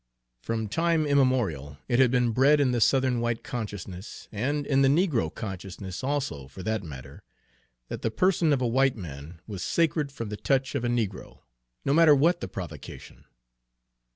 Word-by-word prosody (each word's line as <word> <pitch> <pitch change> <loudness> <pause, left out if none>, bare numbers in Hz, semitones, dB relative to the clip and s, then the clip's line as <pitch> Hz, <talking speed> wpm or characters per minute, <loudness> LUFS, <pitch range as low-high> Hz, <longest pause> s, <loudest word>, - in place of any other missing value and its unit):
From 110 - -2
time 165 +6 +1
immemorial 120 - +1
it 120 -1 +1
had 130 -2 +6
been 125 -1 +2
bred 140 +6 +4
in 135 -3 +3
the 120 -2 0
Southern 130 0 +3
white 120 -1 -1
consciousness, 100 -4 -7
and 140 +7 -1
in 135 -1 +2
the 135 - +5
negro 140 - +2
consciousness 95 -1 -7
also, 130 - -2
for 90 +7 -10
that 110 +1 -1
matter, 70 -5 -10 0.7
that - - -6
the - - 0
person 170 - +2
of 135 -3 +2
a - - +2
white 135 +2 +2
man 80 - -9
was 100 -4 -6
sacred 155 -3 +1
from 115 -5 -6
the 105 - -5
touch 135 +2 0
of 140 -4 -2
a - - 0
negro, 110 -6 -3 0.4
no 140 - +2
matter 160 -1 +7
what 170 +5 +3
the - - -3
provocation. 85 -6 -9
120 Hz, 175 wpm, -27 LUFS, 95-140 Hz, 0.7 s, matter